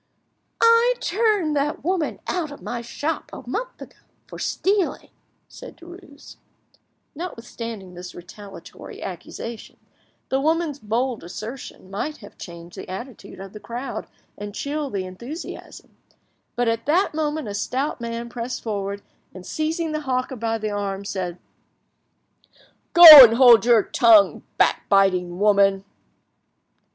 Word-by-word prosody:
"I 460 +2 +4
turned 395 -5 0
that 290 +1 -2
woman 350 -1 -2
out 345 -4 -3
of 285 - -10
my 240 -1 -5
shop 290 +7 -4
a - - -11
month - - -5
ago, - - -17 0.3
for - - -11
stealing," 390 -2 -1 0.4
said - - -13
Derues. 345 -4 -14 0.8
Notwithstanding 230 - -8
this 180 +1 -10
retaliatory 195 +3 -12
accusation, 230 -1 -8 0.5
the 265 0 0
woman's 315 -1 -1
bold 235 +1 -2
assertion 215 +1 -9
might 295 +10 -4
have 205 - -15
changed 170 0 -11
the - - -9
attitude 200 +1 -9
of 195 0 -10
the 210 - -9
crowd 240 +5 -6 0.3
and 205 0 -7
chilled 285 0 -4
the 190 -2 -3
enthusiasm, 240 - -10 0.6
but 245 0 0
at 230 +2 -2
that 345 +5 +2
moment 305 -3 -2
a 205 - -5
stout 260 +6 -3
man 235 0 -5
pressed 240 +1 -6
forward, 200 -2 -4 0.3
and 185 -1 -11
seizing 315 - -3
the 305 0 -3
hawker 260 -2 -2
by 225 -1 -2
the 215 -1 -4
arm, 200 -1 -4
said— 180 -3 -4 1.6
"Go, 345 0 +9 0.2
and 230 -2 +5
hold 235 -4 +7
your 235 -3 +5
tongue, 220 -5 +4 0.2
backbiting 185 -3 +2
woman!" 200 -1 +3
235 Hz, 130 wpm, -22 LUFS, 200-305 Hz, 1.6 s, Go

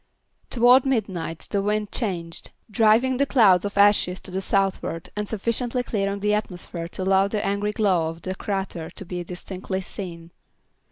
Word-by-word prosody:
Toward 245 +2 +5
midnight 195 - -2
the 200 - +1
wind 210 +1 -1
changed, 175 -8 -3 0.2
driving 225 +5 +4
the 280 +1 +2
cloud 200 -10 +5
of 200 0 -4
ashes 200 -2 +4
to 190 - -8
the 190 +1 -2
southward 195 -4 -1
and 210 0 -3
sufficiently 235 +3 -1
clearing 200 -3 -2
the 210 +1 +2
atmosphere 180 -4 -3
to 185 - -5
allow 190 +1 +3
the 210 +1 -2
angry 200 +1 0
glow 185 -7 +1
of 165 +1 -9
the 185 - -3
crater 190 -4 -4
to 195 - -8
be 180 0 -4
distinctly 190 +2 -5
seen. 170 -3 -7
195 Hz, 165 wpm, -24 LUFS, 180-215 Hz, 0.2 s, Toward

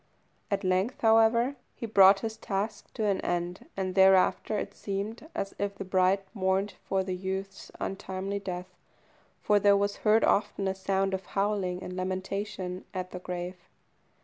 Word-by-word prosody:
At 200 0 -1
length, 185 +6 0
however, 230 +4 +4 0.2
he - - -5
brought 195 -2 +6
his 220 -1 -3
task 205 0 -4
to 220 - -1
an 200 -2 +1
end, 175 +1 -3
and 185 -1 -1
thereafter 190 +2 +4
it - - -4
seemed 210 +9 -5
as 195 - -3
if 200 0 -2
the 195 - -6
bride 185 +1 +3
mourned 190 0 0
for 190 -1 0
the 185 -1 -3
youth's 190 +1 -5
untimely 195 0 -3
death, 185 -1 -6 0.7
for 210 0 +4
there 200 0 +5
was 200 0 0
heard 215 0 +3
often 200 -1 +2
a 190 - +1
sound 195 0 0
of 190 0 -3
howling 195 -3 0
and 180 - -6
lamentation 185 0 -3
at 185 0 -4
the 180 - -6
grave. 180 0 -5
195 Hz, 160 wpm, -29 LUFS, 185-205 Hz, 0.7 s, brought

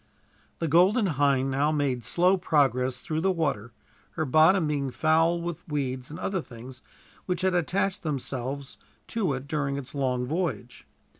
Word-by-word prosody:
The 165 - -2
Golden 185 - +4
Hind 140 -5 +1
now 145 +3 +1
made 140 -5 -1
slow 180 - +3
progress 130 -7 +1
through 155 0 -2
the 190 +2 +2
water, 140 - -2 0.4
her 155 - -1
bottom 160 +6 +4
being 145 -3 -1
foul 160 +5 +2
with 170 -1 -5
weeds 130 -4 -3
and 155 - -8
other 190 0 -2
things 125 -1 -11 0.5
which 180 -1 -1
had 190 0 +2
attached 185 +3 0
themselves 135 -2 -4 0.3
to 200 -10 0
it 135 +1 -6
during 140 -2 -1
its 135 -2 -8
long 130 -3 -1
voyage. 155 -5 -4
150 Hz, 155 wpm, -27 LUFS, 130-170 Hz, 0.5 s, Golden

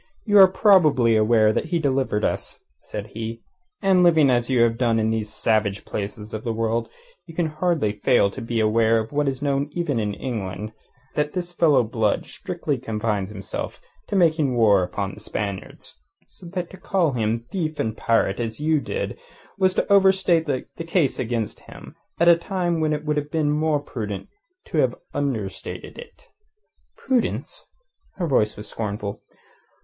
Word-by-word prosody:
"You 205 -2 +5
are 190 - +10
probably 165 - +4
aware 110 0 +4
that - - -1
he 170 +1 0
delivered 135 -8 0
us," - - -3 0.2
said 105 -1 -7
he. 115 +1 -5 0.4
"And 190 -2 +4
living 160 -6 +5
as 120 0 +1
you 125 -3 +4
have 115 -1 +2
done 115 -3 +2
in 110 0 +1
these 110 -1 -2
savage 110 -3 0
places 105 +1 -5
of 110 - -4
the 115 - -1
world, 115 +1 -1 0.4
you 165 - -11
can 175 - +1
hardly 155 - 0
fail 105 -1 +2
to - - -8
be 115 0 -2
aware 110 +1 +3
of 110 0 -3
what 145 0 0
is 135 +1 -2
known 140 0 0
even 155 -8 -1
in 105 -2 -2
England: 105 -3 -5 0.4
that 150 0 -1
this 175 -1 -4
fellow 155 -7 +4
Blood 110 -2 0
strictly 170 -8 -4
confines 105 -4 -2
himself 100 -3 -6 0.3
to - - -3
making 160 -7 +3
war 105 -5 +5
upon 95 +2 -3
the - - -11
Spaniards. 100 -2 -6 0.3
So 180 - -14
that 180 -1 -4
to 190 - -11
call 180 -4 +1
him 115 -1 -1
thief 160 -5 -3
and 110 -1 -1
pirate 115 -3 +1
as 115 0 -3
you 155 +1 +2
did 475 - -4 0.4
was 185 -1 +3
to - - +2
overstate 190 -4 +4
the 135 -3 -1 0.2
case 165 -4 +1
against 115 -3 -2
him - - -12 0.2
at 170 - +4
a 170 - +9
time 175 -1 -1
when 155 -1 +1
it 150 0 -2
would 150 0 0
have 145 0 -2
been 150 -1 +1
more 150 0 +1
prudent 105 -8 -6 0.4
to - - -2
have - - +2 0.2
understated 115 -9 -4
it." 480 - -13 0.7
"Prudence?" 260 - -2 0.5
Her 180 - -2
voice 110 -8 +1
was 105 0 -7
scornful. 105 -2 -4
130 Hz, 175 wpm, -23 LUFS, 110-165 Hz, 0.7 s, are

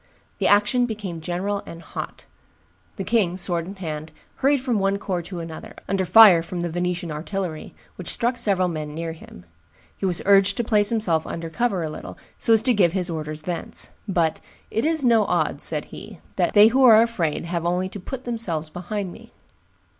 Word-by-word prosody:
The - - +2
action 210 +5 +3
became 200 -7 -6
general 185 +5 -2
and 165 - -9
hot. - - -7 0.7
The 195 - -4
king, 190 -3 +1
sword 175 -2 -1
in 195 - -8
hand, 155 -4 -6 0.3
hurried 280 +1 +2
from 250 -4 -1
one 195 0 +1
corps 185 -3 -3
to 175 +1 -8
another, 165 -1 -9
under 190 -2 -1
fire 205 -6 +8
from 175 +1 -5
the 175 -1 -3
Venetian 175 -1 -2
artillery, 160 +1 -5 0.2
which 180 - -6
struck 240 +2 +1
several 195 -6 +1
men 155 -3 -5
near 165 0 -4
him. 160 - -13 0.5
He 195 - -2
was 175 -2 0
urged 195 -1 +4
to 240 - 0
place 210 -2 +3
himself 185 -9 +1
under 165 -1 -5
cover 215 -4 0
a 155 - -3
little, - - -9 0.2
so - - 0
as 220 -1 +6
to 255 - +4
give 180 -6 +3
his 180 -2 -1
orders 155 -1 -5
thence; 175 0 -4 0.2
but, 170 -5 0 0.3
"It 225 - 0
is 315 -3 +1
no 230 -3 +4
odds," - - 0
said - - +1
he; - - -11 0.2
"they 210 +1 +5
who 265 +3 +2
are 225 -3 +8
afraid 175 -10 -2
have 170 -1 -3
only 180 +2 0
to 205 - -8
put 255 +7 -7
themselves 180 -11 -2
behind 185 +2 -4
me." 230 +1 -15
185 Hz, 190 wpm, -23 LUFS, 170-220 Hz, 0.7 s, fire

